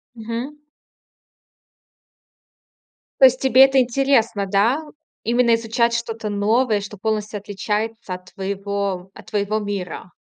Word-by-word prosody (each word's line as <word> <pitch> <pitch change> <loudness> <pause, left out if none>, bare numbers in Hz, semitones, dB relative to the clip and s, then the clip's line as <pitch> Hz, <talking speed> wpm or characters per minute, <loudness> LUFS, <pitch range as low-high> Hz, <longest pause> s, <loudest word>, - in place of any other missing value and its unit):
Мгм. 235 +6 -5 2.6
То 270 - +9
есть 255 0 +5
тебе 265 0 +7
это 270 0 +3
интересно, 240 -4 +2
да? 205 +9 +2 0.4
Именно 235 0 +3
изучать 230 +1 0
что-то 225 -2 -3
новое, 210 +2 +1
что 205 +1 -8
полностью 215 0 -2
отличается 210 +1 -3
от 180 0 -14
твоего 195 -1 -3
от - - -13
твоего 210 0 -1
мира? 195 -3 -5
220 Hz, 110 wpm, -21 LUFS, 200-235 Hz, 2.6 s, То